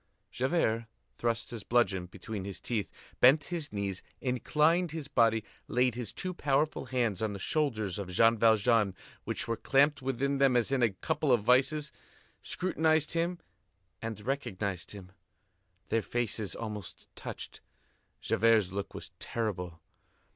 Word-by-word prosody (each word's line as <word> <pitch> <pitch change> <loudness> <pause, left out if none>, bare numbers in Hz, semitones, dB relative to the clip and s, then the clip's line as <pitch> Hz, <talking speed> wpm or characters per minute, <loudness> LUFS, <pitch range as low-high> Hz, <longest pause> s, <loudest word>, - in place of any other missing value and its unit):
Javert 120 -5 0 0.3
thrust 115 0 -1
his 115 -4 -6
bludgeon 95 -7 +2
between 100 +2 -6
his 100 -1 -6
teeth, 110 -4 -2 0.3
bent 140 +4 +7
his 160 -4 -3
knees, 100 -2 -3 0.2
inclined 150 +7 +2
his 155 -2 -5
body, 115 -4 +3 0.2
laid 125 0 +2
his 120 -2 -4
two 185 0 -4
powerful 150 -1 0
hands 120 -7 0
on 110 -2 0
the - - -5
shoulders 110 - -1
of 95 -2 -5
Jean 115 +5 +5
Valjean, 110 -2 +3 0.3
which - - -2
were 115 - 0
clamped 140 +3 +3
within 135 +2 -1
them 135 -2 +5
as 120 +2 +1
in 135 -2 +2
a 120 - +5
couple 130 +8 -1
of 120 -4 +4
vices, 140 +5 +3 0.5
scrutinized 160 -4 +1
him, 170 +1 0 0.6
and 115 -2 -4
recognized 105 -9 -2
him. 95 -3 -9 0.8
Their 115 - +2
faces 110 -3 -2
almost 105 -6 -6
touched. - - -7 0.6
Javert's 110 -4 +3
look 100 +1 -5
was - - -7
terrible. 90 -7 -3
115 Hz, 140 wpm, -31 LUFS, 105-140 Hz, 0.8 s, bent